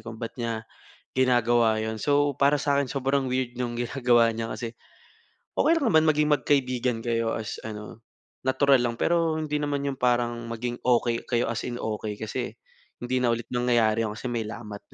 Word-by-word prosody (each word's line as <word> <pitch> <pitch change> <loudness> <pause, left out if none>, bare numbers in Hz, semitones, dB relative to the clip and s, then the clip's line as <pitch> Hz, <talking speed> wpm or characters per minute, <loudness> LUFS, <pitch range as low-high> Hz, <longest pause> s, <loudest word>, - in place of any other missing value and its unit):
kung 110 -1 -7
ba't 115 - -4
niya 115 -1 -3 0.5
ginagawa 120 -3 +3
'yon. 110 0 -3
So, 145 +2 +2
para 140 +1 +5
sa 140 0 +1
akin, 140 - -2
sobrang 135 0 0
weird 125 -1 -1
nung 120 -1 -2
ginagawa 120 -1 +3
niya 115 0 -4
kasi 115 -2 -5 0.9
okey - - +4
lang 285 - -1
naman 160 0 +5
maging 150 -1 +3
magkaibigan 130 -5 +1
kayo 115 -1 0
as 110 - -5
ano, 105 +1 -8 0.5
natural 135 0 +4
lang 120 -1 -1
pero 165 +3 +1
hindi 150 -1 -2
naman 145 -1 -1
yung 140 -2 -3
parang 120 -1 +1
maging 120 +1 -4
okey 120 -1 +1
kayo 120 -2 +1
as 120 - -3
in 120 - -4
okey 110 -2 -3
kasi 110 +4 -4 0.5
hindi 130 +1 0
na 120 -2 +2
ulit 115 0 -8
nangyayari 115 -3 +2
'yon 105 - -5
kasi 120 +2 -5
may 115 -2 -2
lamat 105 -2 -7
120 Hz, 180 wpm, -26 LUFS, 115-135 Hz, 0.9 s, para